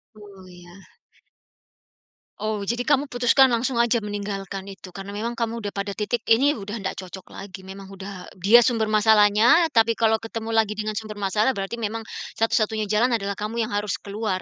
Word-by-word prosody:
Oh, 200 Hz, -3 st, -14 dB
iya. 175 Hz, -1 st, -14 dB, 1.7 s
Oh, 215 Hz, -1 st, -2 dB
jadi 235 Hz, +4 st, -1 dB
kamu 285 Hz, +2 st, +2 dB
putuskan 245 Hz, +2 st, +5 dB
langsung 240 Hz, +2 st, 0 dB
aja 235 Hz, 0 st, +2 dB
meninggalkan 200 Hz, -2 st, -5 dB
itu 195 Hz, -1 st, -10 dB
karena 195 Hz, +2 st, -8 dB
memang 230 Hz, +3 st, -4 dB
kamu 230 Hz, 0 st, -2 dB
udah 205 Hz, -, -3 dB
pada 200 Hz, 0 st, -3 dB
titik, 220 Hz, +3 st, -2 dB
ini 270 Hz, +6 st, +4 dB
udah 205 Hz, +1 st, -6 dB
nggak 190 Hz, -, -4 dB
cocok 185 Hz, +1 st, -11 dB
lagi, 190 Hz, -1 st, -9 dB
memang 190 Hz, +1 st, -10 dB
udah 195 Hz, -1 st, -8 dB, 0.2 s
dia 230 Hz, +5 st, +7 dB
sumber 225 Hz, -3 st, +1 dB
masalahnya, 215 Hz, +8 st, +5 dB
tapi 230 Hz, -4 st, +3 dB
kalau 220 Hz, -1 st, +2 dB
ketemu 225 Hz, 0 st, -6 dB
lagi 220 Hz, -2 st, +2 dB
dengan 215 Hz, 0 st, -4 dB
sumber 215 Hz, -1 st, -6 dB
masalah, 210 Hz, +6 st, +2 dB
berarti 195 Hz, +2 st, -4 dB
memang 225 Hz, 0 st, -3 dB, 0.3 s
satu-satunya 220 Hz, -1 st, 0 dB
jalan, 230 Hz, +4 st, +2 dB
adalah 200 Hz, -3 st, -2 dB
kamu 220 Hz, +3 st, -3 dB
yang 220 Hz, -, -2 dB
harus 205 Hz, -1 st, -2 dB
keluar. 200 Hz, -2 st, -3 dB
215 Hz, 175 wpm, -24 LUFS, 200-230 Hz, 1.7 s, dia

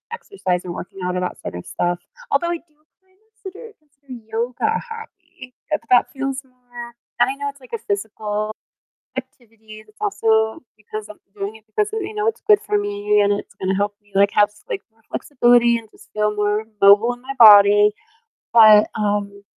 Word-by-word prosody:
exercise 185 Hz, -, -3 dB
or 175 Hz, -, -5 dB
working 180 Hz, +2 st, -8 dB
out 180 Hz, 0 st, -2 dB
or -, -, 0 dB
that -, -, -7 dB
sort -, -, -7 dB
of 90 Hz, -, -9 dB
stuff 175 Hz, 0 st, -2 dB, 0.3 s
although 345 Hz, -4 st, +1 dB
I 345 Hz, -, -1 dB
do 300 Hz, -, -35 dB, 0.3 s
kind 375 Hz, 0 st, -35 dB
of 440 Hz, -, -40 dB
consider 425 Hz, +3 st, -10 dB
consider 285 Hz, -3 st, -15 dB, 0.2 s
yoga 235 Hz, -, -2 dB
a -, -, -4 dB
hobby, 380 Hz, -, -12 dB, 0.2 s
but 305 Hz, -, -1 dB
that 245 Hz, -, +4 dB
feels 275 Hz, 0 st, -4 dB
more 245 Hz, -2 st, -11 dB, 0.3 s
and -, -, +6 dB
I -, -, -1 dB
know 285 Hz, 0 st, -2 dB
it's, 280 Hz, -1 st, -13 dB
like, 255 Hz, -, -17 dB
a -, -, -1 dB
physical 210 Hz, +1 st, -3 dB, 0.6 s
activity, 225 Hz, -4 st, -10 dB
it's 215 Hz, -, -23 dB
also 220 Hz, -, +1 dB, 0.2 s
because 215 Hz, 0 st, -8 dB
I'm 210 Hz, -, -12 dB, 0.2 s
doing 205 Hz, +2 st, -5 dB
it 220 Hz, -, -20 dB
because 415 Hz, -, -2 dB
of 445 Hz, -, -2 dB
you 405 Hz, +3 st, -6 dB
know, 425 Hz, +1 st, 0 dB
it's -, -, -21 dB
good 420 Hz, -1 st, +6 dB
for 210 Hz, -, 0 dB
me 205 Hz, +1 st, 0 dB
and 205 Hz, -, +2 dB
it's 205 Hz, -, -5 dB
gonna 190 Hz, 0 st, -1 dB
help 205 Hz, 0 st, -2 dB
me, 205 Hz, 0 st, -29 dB
like, 200 Hz, +1 st, +4 dB
have 205 Hz, 0 st, +5 dB
s -, -, -21 dB
like, 435 Hz, -5 st, -3 dB
more 225 Hz, -, -33 dB
flexibility 240 Hz, -3 st, +3 dB
and 220 Hz, -2 st, -14 dB
just -, -, -20 dB
feel 210 Hz, 0 st, +1 dB
more 210 Hz, +1 st, 0 dB, 0.2 s
mobile 205 Hz, +4 st, +6 dB
in 245 Hz, -, -22 dB
my 275 Hz, -, -5 dB
body, 205 Hz, -1 st, +8 dB, 0.7 s
but, 215 Hz, -2 st, +8 dB
um, 205 Hz, -1 st, -2 dB
220 Hz, 200 wpm, -20 LUFS, 205-275 Hz, 0.7 s, body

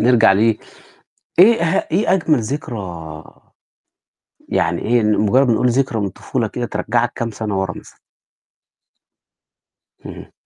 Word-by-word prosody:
نرجع 115 Hz, -4 st, +5 dB
ل 95 Hz, -, +1 dB, 1.0 s
إيه 225 Hz, +5 st, +6 dB
اه 170 Hz, -1 st, 0 dB
إيه 190 Hz, +4 st, +2 dB
أجمل 160 Hz, -7 st, +2 dB
ذكرى 90 Hz, -, -6 dB, 1.3 s
يعني -, -, 0 dB
إيه، 120 Hz, 0 st, +1 dB
مُجرّد 110 Hz, +5 st, +2 dB
نقول 120 Hz, +2 st, +2 dB
ذكرى 120 Hz, -2 st, 0 dB
من 100 Hz, -, -1 dB
الطفولة 95 Hz, -, -3 dB
كده -, -, -4 dB
ترجّعك -, -, -1 dB
كام 115 Hz, -1 st, -3 dB
سَنة 105 Hz, -2 st, -3 dB
وَرا 95 Hz, -1 st, -2 dB
مثلًا؟ -, -, -15 dB, 2.1 s
اهم. -, -, -10 dB
115 Hz, 120 wpm, -18 LUFS, 100-135 Hz, 2.1 s, إيه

